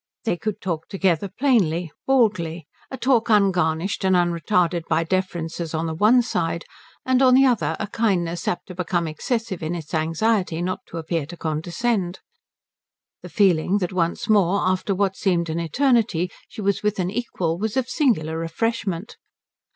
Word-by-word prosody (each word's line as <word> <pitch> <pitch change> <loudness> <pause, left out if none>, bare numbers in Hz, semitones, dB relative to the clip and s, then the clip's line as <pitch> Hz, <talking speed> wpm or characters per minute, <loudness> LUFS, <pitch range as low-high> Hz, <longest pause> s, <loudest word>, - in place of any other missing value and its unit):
They 225 -6 0
could 210 +3 -4
talk 170 -4 -3
together 190 -1 0
plainly, 180 - +1 0.2
baldly, 185 - +1 0.2
a 265 - -6
talk 250 -3 +2
ungarnished 190 -4 +2
and 190 -1 +3
unretarded 175 0 +1
by 165 +1 +2
deferences 170 -2 -2
on 160 +1 -1
the 160 - -2
one 220 +9 +4
side 165 -7 -2 0.4
and 260 0 +3
on 255 -1 +6
the 270 +1 +6
other 165 - +1
a - - -1
kindness 185 -6 -1
apt 175 - -2
to - - -6
become 175 -1 -1
excessive 210 +4 -3
in 160 +2 -2
its 160 -3 -8
anxiety 165 +3 0
not 185 +1 -2
to - - -8
appear 165 -2 -2
to 175 +2 -9
condescend. 175 +5 -2 1.0
The - - -9
feeling 190 -2 +3
that 185 -2 -2
once 170 -2 -1
more 200 -2 +3
after 185 +2 0
what 195 0 0
seemed 170 -4 0
an 165 - -2
eternity 210 - +1 0.2
she - - -8
was 200 -1 0
with 210 0 0
an 185 -1 -1
equal 180 -7 -2
was 220 +4 -2
of 260 - +2
a - - -16
singular 185 - +1
refreshment. 190 +3 -2
185 Hz, 165 wpm, -23 LUFS, 165-215 Hz, 1.0 s, on